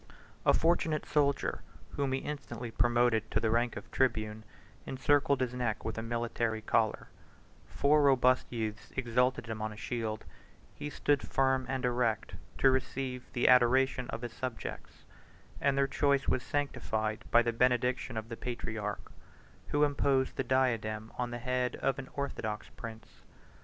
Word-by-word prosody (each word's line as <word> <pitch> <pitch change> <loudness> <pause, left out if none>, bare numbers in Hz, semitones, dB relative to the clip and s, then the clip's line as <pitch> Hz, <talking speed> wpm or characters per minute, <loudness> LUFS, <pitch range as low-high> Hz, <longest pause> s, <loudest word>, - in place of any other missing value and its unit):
A - - +7
fortunate 160 -2 +1
soldier, 140 -2 +1 0.3
whom 140 -2 -1
he 130 0 0
instantly 120 -5 -6
promoted 120 -1 +2
to - - +1
the 110 - +1
rank 120 +1 +1
of - - -9
tribune, 110 -4 0 0.4
encircled 140 0 +2
his 125 -1 0
neck 120 -4 -2
with 110 - -2
a 115 - -3
military 115 -1 -2
collar; 110 0 +1 0.6
four 150 +1 +3
robust 130 -2 +4
youths 110 -3 -4
exalted 125 -1 +1
him 110 -2 -5
on 110 0 -2
a 105 - -10
shield; 110 -3 -3 0.5
he 150 - -6
stood 145 -1 +1
firm 130 -1 +1
and 130 -1 -1
erect 120 -3 0 0.2
to 135 - +5
receive 130 -1 -2
the 120 - +2
adoration 125 +1 +4
of 115 - -5
his 120 -1 -5
subjects; 130 -3 -6 0.6
and 140 -1 +2
their 140 - +4
choice 140 -1 +1
was 130 - +2
sanctified 110 -7 -2
by 120 0 +6
the 120 -1 0
benediction 125 0 +1
of 110 +1 -5
the 115 - -4
patriarch, 110 -4 -5 0.6
who 145 0 +2
imposed 140 -2 +2
the - - -1
diadem 115 -4 0
on 125 -1 0
the 120 - -4
head 125 0 -1
of 135 - -1
an 130 - -7
orthodox 110 -7 -3
prince. 110 -1 -10
125 Hz, 155 wpm, -31 LUFS, 115-135 Hz, 0.6 s, A